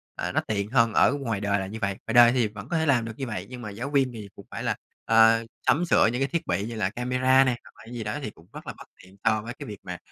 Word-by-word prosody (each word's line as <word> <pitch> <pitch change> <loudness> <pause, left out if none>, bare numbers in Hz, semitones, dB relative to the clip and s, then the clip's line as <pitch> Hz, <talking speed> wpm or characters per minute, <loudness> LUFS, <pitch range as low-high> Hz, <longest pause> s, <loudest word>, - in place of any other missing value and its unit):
à, - - -3
nó - - +1
tiện 105 0 -2
hơn 115 -3 +3
ở - - +4
ngoài 125 -8 -2
đời 100 0 +1
là 95 - -4
như 110 +3 -7
vậy. 100 -1 +1 0.2
Ngoài - - -2
đời 120 0 +8
thì 120 -4 +2
vẫn 105 +1 -10
có 170 - 0
thể 160 - +1
làm 125 -6 +2
được 115 - -6
như 135 - -4
vậy, 110 - -5
nhưng 125 -1 -8
mà 110 - -6
giáo 115 +7 -5
viên 135 -3 +2
thì 105 -3 -8
cũng - - -13
phải - - -5
là, - - 0 0.3
à, 115 0 +5 0.3
sắm 175 +4 +3
sửa 165 - +4
những 125 - -3
cái 135 - +2
thiết 170 +2 -3
bị 90 +3 0
như 115 - -6
là 105 -4 0
camera 130 +3 +3
nè, 125 -2 0
hoặc - - -16
là 115 - -12
gì 115 - -4
đó 105 +7 -3
thì 110 - -4
cũng 85 -3 -19
rất - - -10
là - - -4
bất - - -13 0.2
tiện 95 +1 -17
so 110 -1 +2
với 115 +2 -7
cái 140 +1 -9
việc 105 -2 -8
mà, - - -6
115 Hz, 320 wpm, -26 LUFS, 105-130 Hz, 0.3 s, đời